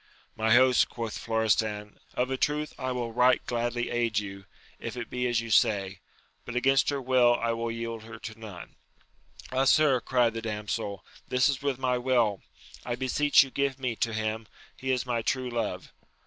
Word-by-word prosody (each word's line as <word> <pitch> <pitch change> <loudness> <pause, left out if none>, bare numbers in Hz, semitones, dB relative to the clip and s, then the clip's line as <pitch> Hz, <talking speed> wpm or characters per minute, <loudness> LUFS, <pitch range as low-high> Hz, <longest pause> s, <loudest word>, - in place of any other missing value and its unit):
My 110 +1 +3
host, 130 0 +5
quoth 115 -2 -5
Florestan, 110 -2 -1 0.2
of 125 +1 0
a - - +1
truth 150 +3 -1
I 130 -1 -2
wiU 120 -3 -3
right 125 +1 +5
gladly 120 0 -2
aid 120 -2 0
you, 100 -2 -4 0.3
if - - -6
it 120 - -6
be 125 0 -1
as 120 -2 +1
you 115 -1 -7
say; 95 -3 +2 0.4
but 125 - -7
against 135 +2 +3
her 140 -1 -1
will 125 -2 +4
I 115 -1 -1
will 115 0 -2
yield 115 -1 -5
her 110 -1 -9
to 110 0 -9
none. 105 -6 -10 0.7
Ah, 130 +1 +1
sir, 135 -3 +4
cried 120 -3 +2
the 115 - -4
damsel, 105 -2 -4 0.2
this 125 +2 +3
is 135 -2 -1
with 140 -2 -1
my 125 -1 0
will! 120 -5 +1 0.4
I 120 - -2
beseech 140 +4 +4
you 135 - -9
give 140 -1 -1
me 125 -3 -2
to 115 - 0
him: 110 0 -3 0.3
he 130 - -6
is 125 -1 +1
my 120 -2 -1
true 130 +2 -1
love. 115 -2 -3
120 Hz, 190 wpm, -28 LUFS, 110-130 Hz, 0.7 s, host